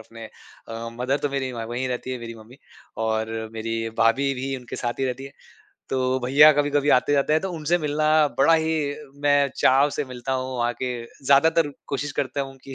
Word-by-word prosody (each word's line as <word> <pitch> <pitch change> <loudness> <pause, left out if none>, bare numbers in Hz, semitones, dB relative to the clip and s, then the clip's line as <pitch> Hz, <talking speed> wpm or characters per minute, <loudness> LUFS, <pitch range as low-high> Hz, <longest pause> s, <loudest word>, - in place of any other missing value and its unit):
अपने 115 +1 -11 0.4
अ, 115 +1 -6
मदर 130 +3 0
तो - - +2
मेरी 135 -1 -2
व 115 -2 -5
वही 125 +2 -2
रहती 125 0 -4
है 130 - -3
मेरी 115 0 -7
मम्मी 115 +3 -15 0.5
और 110 0 -1 0.2
मेरी 115 0 -3
भाभी 135 +5 +3
भी 135 +1 -3
उनके 125 -2 -8
साथ 120 +1 -3
ही - - +1
रहती 130 +1 -3
है। 135 - -10 0.6
तो 130 0 0
भईया 140 +5 +7
कभी-कभी 145 0 +1
आते 135 +3 0
जाते 140 +1 +2
हैं 155 - +3
तो 190 - -3
उनसे 165 +1 0
मिलना 155 -1 -1 0.3
बड़ा 140 +5 +5
ही 160 0 +1 0.5
मैं 145 -1 +3
चाव 135 +3 +4
से 150 - -1
मिलता 125 0 -5
हूँ 130 0 -3
वहाँ 120 0 +1
के 130 - 0 0.4
ज़्यादातर 150 +3 +4 0.2
कोशिश 145 +1 -3
करता 135 +1 -3
हूँ 135 -1 -6
कि 135 - -9
135 Hz, 205 wpm, -24 LUFS, 120-145 Hz, 0.6 s, भईया